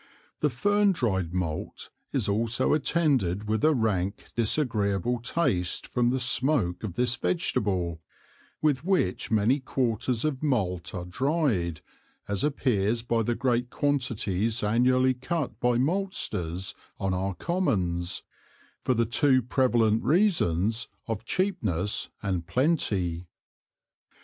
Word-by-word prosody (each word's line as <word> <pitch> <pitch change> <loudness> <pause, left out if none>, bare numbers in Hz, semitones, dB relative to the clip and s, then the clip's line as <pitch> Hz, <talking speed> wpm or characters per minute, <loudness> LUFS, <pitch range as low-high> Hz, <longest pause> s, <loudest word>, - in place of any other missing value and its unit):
The 150 - +2
Fern 205 - +2
dryed 95 - -1
Malt 85 -4 -4 0.2
is - - 0
also 115 +6 +1
attended 135 - +1
with 110 +5 -1
a 155 - +5
rank 105 - -1
disagreeable 115 - +1
Taste 115 - 0
from 120 -1 +1
the 130 +1 0
smoak 125 - +1
of 95 -5 -5
this 120 0 +2
Vegetable, 95 - -1 0.6
with 145 -4 +2
which 175 - 0
many 110 +6 +2
Quarters 125 -1 -1
of 140 -4 -1
Malt 95 - -1
are 90 -1 -4
dryed, 110 - 0 0.5
as 100 -1 -1
appears 115 -6 +1
by 115 -1 0
the 120 +2 0
great 125 -1 0
Quantities 115 -6 0
annually 125 +4 +3
cut 135 +4 -3
by 125 -1 +2
Malsters 120 - -1 0.3
on 95 -1 -1
our 95 +1 -2
Commons, 90 - -1 0.6
for 130 - +1
the 115 0 +2
two 130 +2 +3
prevalent 120 -3 +2
Reasons 115 - +2 0.2
of 115 -1 -4
cheapness 110 - 0
and 90 -4 -2
plenty. 95 - 0
115 Hz, 120 wpm, -27 LUFS, 95-135 Hz, 0.6 s, a